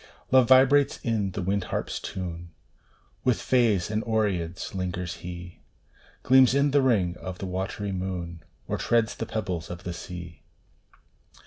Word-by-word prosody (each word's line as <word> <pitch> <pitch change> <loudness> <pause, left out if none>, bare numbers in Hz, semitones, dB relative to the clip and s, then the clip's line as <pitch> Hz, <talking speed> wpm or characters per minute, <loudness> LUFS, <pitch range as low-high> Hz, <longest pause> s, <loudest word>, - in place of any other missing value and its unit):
Love 130 -2 +6
vibrates 135 +2 +5
in 110 -4 0
the 100 - -3
wind 95 +1 0
harp - - -3
s - - -4
tune 85 -2 -6 0.7
With 125 -3 +2
fays 110 -7 +2
and 110 +1 -1
oreads 95 -7 -1
lingers 90 -2 -3
he 90 -1 -8 0.6
Gleams 130 0 +6
in 140 +1 +3
th 140 0 +4
ring 95 -9 +2
of 95 -1 -7
the 95 - -5
watery 95 +2 -3
moon, 90 -3 -4 0.3
Or - - -2
treads 115 -2 +2
the 115 - -5
pebbles 90 -6 -3
of 85 -1 -7
the 90 - -4
sea. 85 -2 -8
95 Hz, 150 wpm, -26 LUFS, 90-115 Hz, 0.7 s, Love